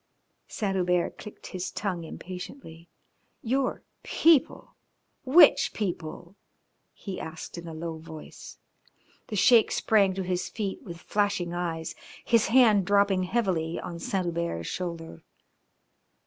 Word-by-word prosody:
Saint 200 -3 -2
Hubert 180 -1 0
clicked 210 - -11
his 185 0 -4
tongue 185 -3 -3
impatiently. 170 - -9 0.5
"Your 260 +3 -1 0.2
people! 320 -5 +2 0.5
which 290 +7 +6
people?" 175 -2 -5 0.6
he 195 -3 -7
asked 160 0 -7
in 170 0 -8
a 165 - -7
low 165 0 -5
voice. 160 -1 -11 0.7
The 215 - -5
Sheik 225 +3 +5
sprang 200 -4 +3
to 190 - -2
his 180 0 -2
feet 205 -4 -4
with 170 -3 -9
flashing 200 -3 -1
eyes, 165 -2 -3 0.3
his 230 -2 +3
hand 225 -5 +5
dropping 200 -2 +3
heavily 180 -7 -1
on 170 -1 -7
Saint 195 -3 -2
Hubert's 170 - -3
shoulder. 170 - -5
185 Hz, 120 wpm, -27 LUFS, 170-205 Hz, 0.7 s, which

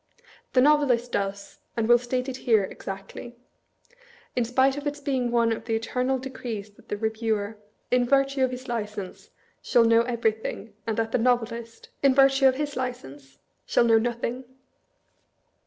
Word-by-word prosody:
The 255 - +5
Novelist 265 -4 +3
does, 200 0 -3 0.2
and 225 -1 +1
will 240 0 +6
state 250 +1 -2
it 260 -1 -4
here, 225 -6 +3
exactly; 195 +5 -8 1.0
in 245 - +2
spite 260 +3 +2
of 290 +1 -4
its 290 0 -3
being 265 -4 -1
one 235 -1 +2
of 225 - -3
the 225 - 0
eternal 250 +4 -1
decrees 240 -5 -6
that 205 - -23
the 205 - -2
Reviewer, 220 -1 -2 0.3
in 250 0 +3
virtue 275 0 +2
of 260 - +3
his 255 +1 -7
license, 210 -5 -5 0.3
shall 240 -2 +4
know 230 0 +5
everythiag, 220 -2 -2 0.2
and 225 -1 -1
that 225 0 -1
the 250 - +1
Novelist, 230 -1 -1
in 275 -2 +4
virtue 270 0 +5
of 260 - +3
his 290 +1 -3
license, 145 - -6 0.3
shall - - +3
know 225 -1 +5
nothing. 240 +2 -3
240 Hz, 160 wpm, -26 LUFS, 220-260 Hz, 1.0 s, will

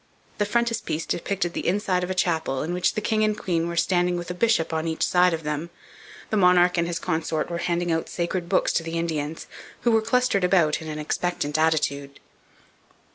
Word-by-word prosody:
The 205 - +1
frontispiece 230 -8 -1
depicted 175 -1 -2
the - - -3
inside 185 -1 +1
of 180 - -3
a 185 - -2
chapel, 160 -7 0
in 165 +3 -3
which 180 0 +1
the 215 - -1
king 215 -1 +2
and 215 0 +1
queen 170 -4 -1
were 170 0 -4
standing 175 0 +2
with 175 0 -5
a - - -2
bishop 180 -4 +1
on 160 +1 -1
each 160 -1 0
side 180 0 +4
of 165 -1 -3
them. 150 +2 -3 0.6
The 215 - +1
monarch 180 -1 +5
and 170 - +1
his 170 -1 -2
consort 160 0 -2
were 170 - -2
handing 170 -1 0
sacred 175 0 -3
books - - +2
to - - +1
the 165 0 -4
Indians, 160 -2 -3 0.4
who 240 - +2
were 225 -1 +4
clustered 230 -3 +1
about 175 -5 +3
in 160 - -8
an 155 -1 -5
expectant 150 -1 -2
attitude. 140 -3 0
175 Hz, 200 wpm, -24 LUFS, 160-185 Hz, 0.6 s, monarch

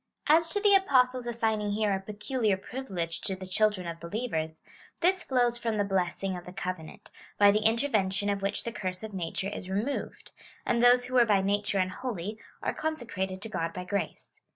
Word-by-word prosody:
As 325 +2 +5
to 410 - 0
the 410 -1 +5
Apostle's 255 -9 +4
assigning 220 -3 0
here 210 -1 +1
a 190 - 0
peculiar 210 +1 -1
privilege 190 -7 -4
to 190 - 0
the 185 0 -8
children 195 0 +1
of 165 -1 -5
believers, 170 -4 -3 0.4
this 370 +2 +3
flows 245 -2 +1
from 230 -2 -1
the 205 - +2
blessing 195 -1 -1
of 175 - -7
the 180 - -9
covenant, 180 -3 -6 0.3
by 205 0 +7
the 210 +1 +2
intervention 215 -5 +2
of 200 -1 0
which 200 +1 -1
the 235 - -3
curse 185 -2 -4
of 220 -1 -6
nature 190 +1 -3
is 190 -2 -6
removed; 215 +9 -3 0.3
and 235 -1 +2
those 245 0 +6
who 255 - -7
were 245 -2 +6
by 200 -3 +3
nature 205 +1 +1
unholy 200 +1 -2 0.2
are - - 0
consecrated 210 -11 -3
to 225 - -5
God 165 -5 -2
by 180 - -5
grace. 180 -2 -4
205 Hz, 190 wpm, -29 LUFS, 185-240 Hz, 0.4 s, by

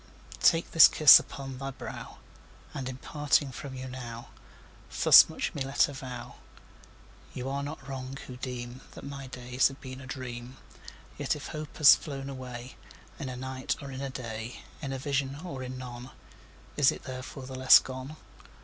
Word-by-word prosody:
Take 165 0 +4
this 165 - +10
kiss 155 -2 +9
upon 135 -2 -8
the 135 0 -5
brow! - - -8 0.6
And, 130 -2 -4
in 130 - -7
parting 145 0 +1
from 130 +1 -8
you 130 0 -6
now, 120 -2 -8 0.7
Thus - - +9
much - - -3
let 140 - -2
me 135 +1 -6 0.2
avow 125 -3 -8 1.0
You 125 +1 -4
are 140 +1 -2
not 140 -1 -7
wrong, 135 0 -6
who 125 - -9
deem 125 0 -6
That - - -10
my 140 -1 -7
days 125 0 +1
have 135 0 -9
been 130 0 -9
a 130 - -11
dream: 125 -1 -7 0.6
Yet - - 0
if - - -8
hope 150 -1 -7
has 150 -2 +9
flown 140 -3 -7
away 125 -1 -8 0.4
In 140 -4 -4
a 125 - -6
night, 130 +2 -3
or 140 -1 -8
in 130 0 -6
a 135 - -3
day, 115 -3 -7 0.2
In 140 -3 -4
a 135 - -3
vision 135 0 -2
or 140 -7 -6
in 130 0 -6
none, 125 0 -8 0.7
Is 145 -3 +5
it - - -9
therefore 130 +1 -7
the 130 - -8
less 130 0 +8
gone? 130 +3 -5
130 Hz, 175 wpm, -29 LUFS, 125-140 Hz, 1.0 s, this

